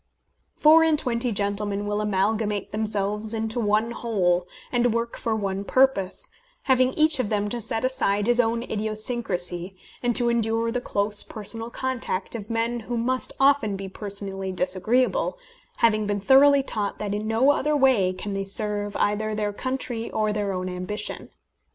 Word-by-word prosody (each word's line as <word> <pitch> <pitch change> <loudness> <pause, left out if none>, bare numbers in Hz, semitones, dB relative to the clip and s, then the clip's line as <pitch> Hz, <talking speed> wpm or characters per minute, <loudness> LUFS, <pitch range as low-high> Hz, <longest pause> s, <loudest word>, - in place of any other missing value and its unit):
Four 315 +2 +6
and 320 -2 +3
twenty 245 -3 -1
gentlemen 205 0 -1
will 205 0 -1
amalgamate 210 0 -1
themselves 210 0 -1
into 225 +1 -2
one 215 +1 +1
whole, 180 -7 0 0.2
and 245 -2 +2
work 235 0 -2
for 225 -1 -2
one 195 -2 -2
purpose, 230 -6 +1 0.3
having 255 -1 +3
each 310 -2 +4
of 220 - 0
them 210 -1 0
to 240 - -3
set 225 +2 -2
aside 205 -6 +1
his 240 +1 +3
own 230 0 +1
idiosyncrasy, 205 -5 -3 0.2
and 240 -1 0
to 240 - +4
endure 230 0 0
the 245 +1 -2
close 205 -2 0
personal 225 +2 -5
contact 245 -7 -3
of 215 -2 -6
men 230 +1 -1
who 235 +1 -4
must 255 +2 -1
often 270 -7 +3
be 195 0 -6
personally 195 -1 -4
disagreeable, 225 - 0 0.4
having 215 -2 +2
been 205 0 -1
thoroughly 275 +6 +5
taught 210 -6 -2
that 205 -1 -3
in 210 +1 -3
no 230 +6 +4
other 295 +1 +1
way 255 -9 +3
can 185 +2 -6
they 195 0 -2
serve 205 +1 0
either 215 +1 0
their 210 -1 -2
country 245 -1 -3
or 215 -1 0
their 205 -1 -1
own 185 -1 -3
ambition. 185 +3 -4
215 Hz, 165 wpm, -24 LUFS, 200-240 Hz, 0.4 s, Four